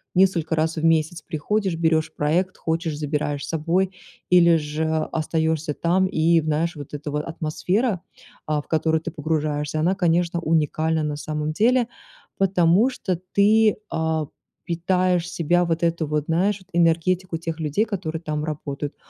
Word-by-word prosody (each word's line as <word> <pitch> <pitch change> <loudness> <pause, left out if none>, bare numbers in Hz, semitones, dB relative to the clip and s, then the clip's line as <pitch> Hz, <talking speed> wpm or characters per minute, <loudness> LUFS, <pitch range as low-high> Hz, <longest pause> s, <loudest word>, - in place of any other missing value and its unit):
несколько 175 -4 +3
раз 160 +1 0
в 155 - -3
месяц 165 0 +2
приходишь, 185 +5 -1
берешь 160 -1 +1
проект, 175 +5 0
хочешь- 160 -1 -2
забираешь 145 -1 -2
с - - -10
собой 170 +4 0 0.4
или 170 -2 +6
же 150 +1 -3 0.3
остаешься 160 -1 0
там, 180 +5 +1
и 165 -1 +3
в - - -8
знаешь, 160 +3 0
вот 145 -1 -9
эта 145 +1 -5
ва 150 - -1
атмосфера, 180 +7 -1 0.5
а, 150 -1 0
в - - -25
которую 160 0 +1
ты 165 - -5
погружаешься, 150 -1 -2
она, 175 +5 +2
конечно, 170 -2 +1
уникальна 160 0 +1
на 150 -1 -2
самом 150 0 -3
деле, 235 +6 +3 0.5
потому 190 +3 +3
что 190 -9 -3 0.2
ты, 215 +1 +4
а, 160 -2 -1 0.4
питаешь 180 0 +1
себя 175 0 +1
вот 165 0 -1
эту 165 -1 +1
вот, 150 0 -1
знаешь, 190 +5 +1
вот 185 - -21
энергетику 170 +2 +2
тех 165 0 -5
людей, 155 +6 +1
которые 175 -7 -4
там 150 -2 -3
работают. 145 -2 -5
165 Hz, 155 wpm, -23 LUFS, 155-180 Hz, 0.5 s, или